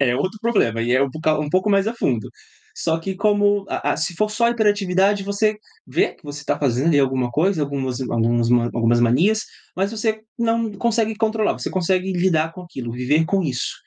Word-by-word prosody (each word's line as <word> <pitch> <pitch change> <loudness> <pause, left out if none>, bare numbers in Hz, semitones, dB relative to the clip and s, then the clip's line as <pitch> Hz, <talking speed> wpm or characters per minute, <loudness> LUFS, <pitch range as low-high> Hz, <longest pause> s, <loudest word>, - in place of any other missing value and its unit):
é 125 -3 +2
outro 190 +7 -2
problema 120 - +1
e 120 +1 0
é 130 +2 +4
um 135 - -1
pou 155 +1 0
um 145 - -4
pouco 185 +5 +1
mais 200 +1 +3
a 235 - -4
fundo. 120 - -1 0.5
Só 160 -1 0
que 190 +3 -4
como 205 -1 +2
a 145 - -1
a - - -2
se 160 +2 -2
for 215 +5 0
só 235 +2 +1
a - - +3
hiperatividade 205 -3 +2
você 210 +1 0 0.3
vê, - - 0
que - - -29
você 145 0 -8
tá - - -1
fazendo 140 +4 +1
aí 145 - +4
alguma 130 -2 0
coisa, 160 +4 +1
algumas 135 -3 -3
alguns 115 -1 +1 0.2
algumas 120 0 +2
manias, 170 - +3 0.4
mas 195 +2 0
você 220 -1 -2 0.2
não 230 -1 0
consegue 220 +1 0
controlar, 220 -1 +1
você - - -5
consegue 185 +1 0
lidar 165 -3 +1
com 185 - -10
aquilo, 130 -9 -7
viver 140 +6 +1
com 195 +3 0
isso. 130 -6 -2
180 Hz, 210 wpm, -21 LUFS, 135-205 Hz, 0.5 s, é